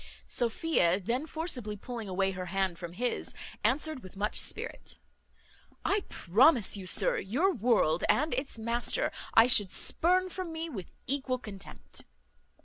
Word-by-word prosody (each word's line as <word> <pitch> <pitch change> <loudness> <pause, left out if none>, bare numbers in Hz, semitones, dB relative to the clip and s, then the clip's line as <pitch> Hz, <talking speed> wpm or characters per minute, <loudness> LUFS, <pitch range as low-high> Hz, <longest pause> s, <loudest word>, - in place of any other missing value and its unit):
Sophia 230 - +2
then, 240 - -2
forcibly 275 -11 -3
pulling 230 -1 -6
away 190 +1 +1
her 185 -1 -6
hand 190 -1 -1
from 170 -1 -7
his, 245 +6 -2 0.3
answered 300 0 +1
with 185 -2 -12
much 210 +2 -1
spirit, - - -3 0.9
"I 405 -1 +1
promise 225 - +3
you, 190 -2 -7
sir, - - +3
your 295 - +1
world 210 - +2
and 300 +1 +2
its 260 0 -2
master 235 +2 0 0.2
I 225 - +8
should 205 -6 +5
spurn 370 +2 +2
from 365 -2 -5
me 325 +1 -4
with 190 - -7 0.2
equal 265 -1 0
contempt." 205 -5 -9
235 Hz, 140 wpm, -30 LUFS, 195-300 Hz, 0.9 s, I